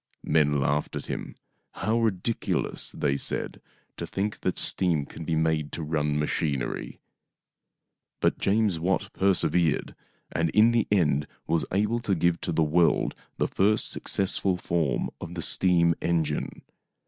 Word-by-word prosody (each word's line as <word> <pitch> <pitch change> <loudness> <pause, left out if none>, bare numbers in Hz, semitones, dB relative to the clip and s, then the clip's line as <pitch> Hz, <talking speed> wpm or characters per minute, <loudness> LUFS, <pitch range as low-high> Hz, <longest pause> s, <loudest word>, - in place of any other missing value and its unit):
Men 75 -2 +2
laughed 70 +2 0
at - - -4
him. - - -5 0.2
" - - -48
How 115 +2 +2
ridiculous," 110 0 -1
they 70 -1 -1
said, - - -3 0.2
" - - -42
to - - -5
think 105 +2 -3
that 95 - -1
steam 85 -6 +2
can 80 - -9
be 80 - 0
made 80 -2 0
to 80 - -4
run 75 -1 0
machinery! 75 -3 -2 0.6
" - - -59
But - - +1
James 100 -4 +2
Watt 95 +3 -1
persevered, 90 -4 +2 0.4
and 85 0 0
in 110 +2 +6
the 115 -2 +1
end 75 -7 +2 0.2
was 85 -1 +1
able 105 +5 +1
to 105 -5 0
give 85 0 +1
to - - -2
the 80 0 +2
world 80 +2 +2 0.2
the - - +1
first 105 +3 +1
successful 95 -1 -1
form 85 -7 -1
of 85 +1 -7
the 85 - -3
steam 85 -2 +3
engine. 80 -3 -1
85 Hz, 155 wpm, -27 LUFS, 75-95 Hz, 0.6 s, in